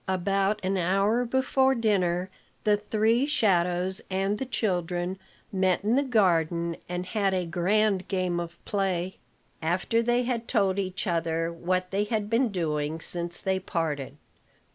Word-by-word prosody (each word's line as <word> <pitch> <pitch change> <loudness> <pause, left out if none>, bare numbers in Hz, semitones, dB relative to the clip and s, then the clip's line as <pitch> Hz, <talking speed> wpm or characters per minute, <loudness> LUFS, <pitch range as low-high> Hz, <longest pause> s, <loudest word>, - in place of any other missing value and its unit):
About 195 +2 +1
an 195 +1 +1
hour 195 +7 +2
before 265 +2 +2
dinner, 185 -5 +1 0.3
the 210 -1 +4
three 220 +5 +1
shadows 185 - +1
and 195 +2 0
the 265 - -3
children 180 -5 -1 0.3
met 190 -1 +1
in 220 +4 +2
the 275 - +4
garden, 170 - +2
and 180 0 -3
had 195 -1 0
a 180 -1 0
grand 190 +3 +1
game 185 -3 0
of 170 0 -6
play, 190 -2 -1 0.4
after 180 +8 +1
they 240 +1 +2
had 240 -2 -2
told 200 -4 +2
each 185 -1 -3
other 165 -1 -1
what 180 +2 -1
they 200 +2 +1
had 215 -1 -2
been 235 +1 +3
doing 155 -4 -2
since 175 +1 -1
they 190 -1 0
parted. 150 -6 -3
190 Hz, 145 wpm, -27 LUFS, 175-215 Hz, 0.4 s, the